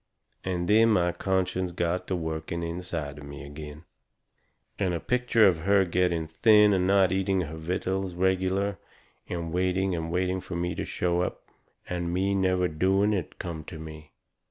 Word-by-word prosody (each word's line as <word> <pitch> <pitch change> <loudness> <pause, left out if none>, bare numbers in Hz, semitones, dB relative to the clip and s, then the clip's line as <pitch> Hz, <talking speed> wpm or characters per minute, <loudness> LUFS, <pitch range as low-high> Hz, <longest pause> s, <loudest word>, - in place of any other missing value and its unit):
And 90 -2 -2
then 110 +3 +5
my 90 -5 +3
conscience 95 0 -1
got 85 +1 -1
to 95 - -1
working 80 0 -3
inside 85 -4 -4
of - - -10
me 70 0 -9
agin. 75 +1 -9 1.0
And 95 -3 +1
a - - -2
picture 125 -1 +3
of 85 -4 +2
her 100 +3 +3
getting 85 -2 +1
thin 105 +6 +5
and 90 -1 +2
not 95 -2 +4
eating 95 0 +1
her 80 -2 -5
vittles 90 +3 -2
regular 95 +2 0 0.5
and 85 -2 -4
waiting 90 +1 +1
and 80 -1 -3
waiting 90 +1 0
fur 95 -1 -7
me 85 0 -1
to - - -4
show 90 0 0
up, - - -3 0.4
and 85 -1 -2
me 95 +3 +1
never 95 -2 +2
doing 95 +6 +2
it, 95 - -3
come 85 -3 -5
to 80 - -8
me. 80 -1 -10
90 Hz, 170 wpm, -27 LUFS, 85-95 Hz, 1.0 s, then